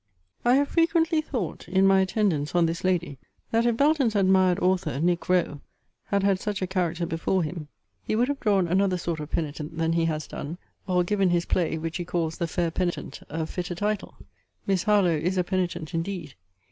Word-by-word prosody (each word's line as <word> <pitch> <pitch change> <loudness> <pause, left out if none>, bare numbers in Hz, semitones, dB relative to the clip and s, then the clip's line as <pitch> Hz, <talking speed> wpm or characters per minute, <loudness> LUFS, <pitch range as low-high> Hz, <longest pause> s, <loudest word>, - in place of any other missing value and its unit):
I 245 +1 +5
have 280 +1 +2
frequently 330 -1 +2
thought, 240 - -4
in 190 +2 +3
my 195 0 +5
attendance 185 -6 0
on 175 -1 +4
this 165 0 -2
lady, 170 -7 0 0.3
that 230 +1 +2
if 235 -1 +1
Belton's 280 -5 +3
admired 190 -2 +4
author, 180 -7 0
Nic. 175 +2 0
Rowe, 175 -5 +1 0.4
had 200 -1 0
had 195 -1 +2
such 205 -1 -3
a - - +2
character 175 -2 -1
before 170 +3 0
him, 155 -1 -5 0.3
he - - -2
would 240 +3 +2
have 285 0 -2
drawn 200 -7 +2
another 185 +1 +2
sort 170 -2 -3
of 150 0 -6
penitent 155 0 -4
than 165 0 +1
he 165 0 +2
has 155 -2 -2
done, 155 +4 -6 0.3
or 180 -1 +2
given 195 0 +1
his 175 -1 +1
play, 165 -2 0
which 165 +2 -4
he 175 - -3
calls 165 -2 -2
The 170 - 0
Fair 170 0 -1
Penitent, 175 +1 -3
a 160 +1 -2
fitter 180 +2 -4
title. 205 +2 -2 0.5
Miss 195 -2 +1
Harlowe 200 -6 +3
is 180 +5 -1
a 180 - +3
penitent 175 -3 -2
indeed! 165 -3 -3
180 Hz, 195 wpm, -26 LUFS, 165-200 Hz, 0.5 s, I